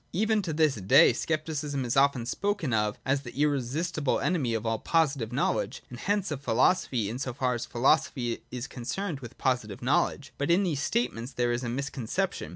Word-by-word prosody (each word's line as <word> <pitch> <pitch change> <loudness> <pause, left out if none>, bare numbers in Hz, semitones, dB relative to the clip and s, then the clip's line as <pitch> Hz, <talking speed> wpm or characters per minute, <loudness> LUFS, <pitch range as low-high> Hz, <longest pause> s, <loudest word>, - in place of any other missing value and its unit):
Even 215 +3 +2
to 175 -4 -3
this 155 -2 +3
day 95 +4 +6
Scepticism 150 -1 -2
is 120 - -1
often 135 -3 +3
spoken 200 - -1
of 105 -1 +1
as 135 +1 +1
the 135 0 -9
irresistible 145 +2 0
enemy 135 -10 0
of 110 0 -3
all 115 -1 0
positive 140 -9 +1
knowledge, - - -1
and 120 - -8
hence 200 0 0
of 140 -2 -3
philosophy, 125 - +2
in 115 +5 -4
so 130 -2 -3
far 130 -3 0
as 120 - -4
philosophy 120 -1 +1
is 125 0 -5
concerned 145 +7 -4
with 120 -3 -10
posi 125 -4 0
tive 100 +2 -9
knowledge. 135 0 0
But 145 - -1
in 175 +4 +4
these 155 -7 -1
statements 140 - -1
there 120 0 +1
is 120 +1 -1
a - - -2
miscon 130 -1 -4
ception. - - -1
135 Hz, 195 wpm, -28 LUFS, 120-155 Hz, -, day